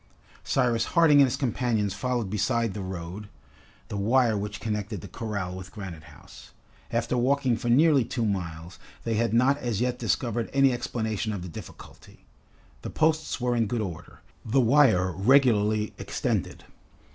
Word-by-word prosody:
Cyrus 120 -4 +1
Harding 155 -4 +6
and 140 - +7
his 130 +2 -2
companions 115 -6 -1
followed 125 0 -2
beside 110 +1 0
the 105 - -5
road 95 +2 -7 0.6
the 105 - -4
wire 115 +2 +2
which 105 0 -4
connected 105 -3 -4
the - - -9
corral 100 -5 -4
with 95 0 -9
Granite 95 -7 -8
House. 65 +1 -15 0.4
After - - -1
walking 130 0 +2
for 120 +1 -3
nearly 145 +2 +5
two 115 0 -2
miles, 85 -3 -4 0.2
they 115 - -1
had 115 +1 +1
not 130 +5 +3
as 120 -6 -2
yet 125 0 -1
discovered 115 0 -1
any 135 -1 +4
explanation 110 -2 -3
of 95 -4 -5
the 90 - -7
difficulty. 80 - -12 0.6
The - - -6
posts 155 -2 0
were 125 0 0
in 115 -2 +1
good 120 +3 -2
order, 85 -5 -7 0.2
the 120 +5 +1
wire 115 -8 +4
regularly 110 -1 +3
extended. - - -3
115 Hz, 155 wpm, -26 LUFS, 100-125 Hz, 0.6 s, and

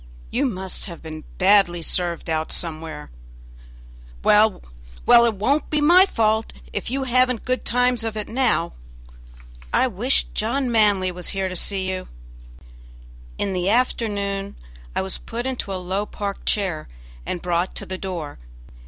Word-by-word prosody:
you 275 +3 +1
must 190 -5 -4
have 170 -4 -8
been 155 -1 -7
badly 185 -3 +4
served 175 0 0
out 160 -1 -1
somewhere; 160 - -3 1.1
well, 210 -1 +4 0.4
well, 235 - +7
it 225 - 0
won't 270 +10 +1
be 305 - +1
my 350 +6 +7
fault 220 - +1 0.2
if - - -3
you 270 +2 -1
haven't 255 -2 +2
good 255 0 0
times 245 -1 +2
of 225 -1 -3
it 210 - -3
now. 230 -8 +1 1.0
I - - +4
wish 245 +3 +1
John 245 +4 0
Manly 205 -5 +3
was 180 0 -5
here 190 -1 0
to 185 - -5
see 190 +1 -1
you." 185 0 -3 1.3
In 195 - -1
the 180 +1 0
afternoon 200 -4 0 0.4
I - - +1
was 190 - -3
put 235 +2 -5
into 255 -6 -3
a - - -2
low 185 +3 -2
park 200 -1 -5
chair 190 -7 0 0.4
and 175 - -3
brought 175 +1 -1
to - - -3
the 185 0 -5
door. 170 - -5
200 Hz, 155 wpm, -23 LUFS, 185-235 Hz, 1.3 s, well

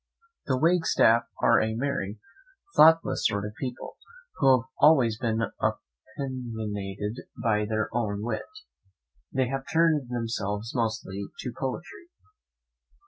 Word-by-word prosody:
The 130 - +1
Wagstaffs 155 -7 +3 0.2
are 115 - +5
a 110 0 -1
merry, 115 -5 -2 0.6
thoughtless 165 +1 +5
sort 100 0 -2
of 105 - -6
people, 125 -2 -6 0.4
who 135 -3 +5
have 130 - -19
always 125 -8 +5
been 115 -2 0 0.6
opinionated 110 -6 -5 0.2
of 105 -2 0
their 110 -1 0
own 105 -3 -1
wit; 115 -1 -3 0.8
they 130 -1 +1
have 135 0 -3
turned 160 -5 +2
themselves 115 -2 -3
mostly 110 -5 -2
to 125 - -5
poetry. 175 - -6
115 Hz, 115 wpm, -27 LUFS, 110-135 Hz, 0.8 s, are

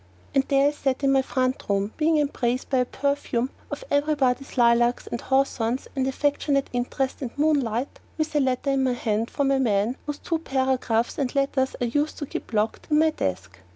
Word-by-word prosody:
And 270 - +3
there 275 0 +4
I - - -2
sat 275 -2 -2
in 275 - +4
my 270 0 +4
front 255 0 -1
room, 200 +1 0
being 320 0 +3
embraced 265 -3 -1
in 260 - +4
a 250 - +2
perfume 270 -2 -1 0.2
of - - -5
everybody's 285 -3 +1
lilacs 240 0 +3
and 235 - -5
hawthorns 260 -2 0
and 265 -1 0
affectionate 280 0 0
interest 260 +3 -2
and 260 - -3
moonlight, 280 -5 0 0.2
with 310 -1 -2
a - - +4
letter 265 +1 +1
in 270 -1 +2
my 255 -1 +2
hand 225 -1 -1
from 280 -1 0
the 275 -1 +3
man 225 0 +1
whose 295 -1 -3
two 330 +1 -2
photographs 260 -5 0
and 270 -1 -1
letters 275 -1 +1
I - - -1
used 290 +6 -1
to 290 - -4
keep - - -6
locked 215 0 -1
up - - -22
in - - +5
my 315 +1 +4
desk. 95 - -4
265 Hz, 200 wpm, -25 LUFS, 240-285 Hz, 0.2 s, in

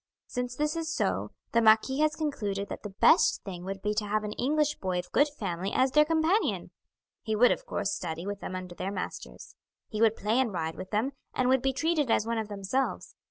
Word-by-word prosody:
"Since 250 -1 -4
this 300 +4 0
is 325 -1 -2
so, - - 0 0.2
the 235 - +3
marquis 220 +5 +4
has 305 0 +2
concluded 205 -11 -2
that - - -6
the 210 - -6
best - - +5
thing 180 -3 -7
would 195 0 -5
be 210 - +1
to 210 0 -1
have 215 +1 0
an 210 - -3
English 295 +6 0
boy 185 -2 -1
of 180 0 -5
good 290 - +4
family 195 -8 -4
as 260 0 +2
their 300 +2 +5
companion. 325 +6 +1 0.5
He 220 - -2
would, 245 +3 +6
of - - -2
course, 200 - -1
study 165 +2 -4
with 205 0 -4
them 185 - -5
under 185 -1 -6
their 190 +2 -4
masters. 195 - -6 0.4
He 215 -1 -3
would 225 -1 +5
play 220 +4 +1
and 255 -4 +1
ride 160 -3 -2
with 185 +2 -8
them, 220 +6 0 0.2
and 255 -1 +2
would 260 -1 +4
be 270 - +1
treated 300 0 0
as 220 - +3
one 230 0 -1
of 220 - -3
themselves. 205 +6 -2
220 Hz, 225 wpm, -29 LUFS, 195-270 Hz, 0.5 s, would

